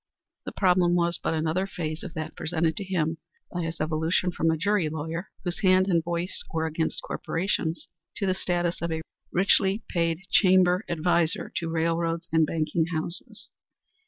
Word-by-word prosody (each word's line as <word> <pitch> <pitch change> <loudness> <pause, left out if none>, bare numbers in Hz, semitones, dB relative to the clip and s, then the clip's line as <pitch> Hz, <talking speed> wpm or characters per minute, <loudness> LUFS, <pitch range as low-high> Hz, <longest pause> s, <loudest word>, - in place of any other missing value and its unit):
The - - -4
problem 180 -2 +3
was 170 0 +1
but - - -1
another 160 +4 0
phase 155 -4 -4
of 175 - -7
that 155 0 -5
presented 160 0 0
to 200 - -1
him 165 -4 -1 0.3
by 175 - -2
his 165 0 -4
evolution 160 +3 +1
from 165 -1 +1
a 160 - +2
jury 190 -1 +1
lawyer, 160 +5 -4
whose 175 -1 -3
hand 185 -1 +4
and 170 -4 +2
voice 175 +2 -2
were 160 0 0
against 160 0 -2
corporations, 165 -2 -2 0.3
to 200 - -1
the 185 - +2
status 175 -2 -1
of 170 0 -2
a 160 0 -2 0.3
richly 195 +3 +3
paid 165 -1 0
chamber 185 -1 +5
adviser 170 0 +1
to 165 - -2
railroads 165 +1 0
and 160 -1 +4
banking 160 +1 0
houses. 170 0 -3
170 Hz, 165 wpm, -26 LUFS, 160-180 Hz, 0.3 s, chamber